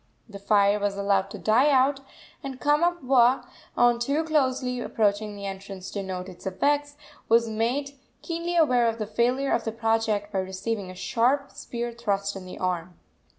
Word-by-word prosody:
The 200 -3 -10
fire 200 0 +3
was 200 -1 -1
allowed 200 -1 +1
to - - -7
die 245 +7 +3
out, 270 0 +3 0.4
and 265 -2 -6
Kamapuaa, 290 -5 +3 0.3
on 240 -1 +4
too 280 +6 0
closely 260 -5 0
approaching 210 -2 0
the 200 0 -7
entrance 195 -1 -7
to 200 - -3
note 185 -1 -5
its 185 0 -9
effects, 290 +9 0 0.3
was 230 0 +4
made 235 +6 -1 0.3
keenly 340 +1 -3
aware 255 -8 +4
of 230 0 -1
the 215 - -3
failure 245 +6 0
of - - +1
the 225 - -2
project 225 -2 0
by 195 - +1
receiving 190 +2 -3
a 185 - -9
sharp 265 +7 +1
spear 240 0 -5
thrust 200 -4 -2
in 185 -1 -8
the - - -8
arm. 180 -1 -3
230 Hz, 170 wpm, -26 LUFS, 200-265 Hz, 0.4 s, on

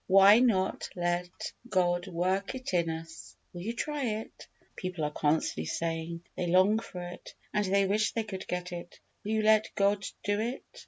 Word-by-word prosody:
Why 195 +3 +8
not 215 -7 +2
let 175 0 -2 0.2
God 175 -2 +2
work 185 +5 0
it 255 -6 -5
in 170 -2 +2
us? 165 0 -7 0.2
Will 175 - -6
you 225 +6 -3
try 295 +2 -2 0.2
it? - - -13 0.3
People 185 -3 -4
are 150 - 0
constantly 150 - 0
saying, 165 - -3
"They 180 - -2
long 185 +5 +5
for 180 -5 -7
it, 175 0 -9 0.2
and 210 -1 +2
they 195 +1 +3
wish 210 +2 +1
they 225 - 0
could 195 -3 -7
get 180 0 -3
it." 175 0 -8 0.2
Will 215 - -2
you 220 - +2
let 215 0 +5
God 200 0 +2 0.2
do 205 0 +1
it? 235 +4 -3
185 Hz, 180 wpm, -30 LUFS, 175-210 Hz, 0.3 s, Why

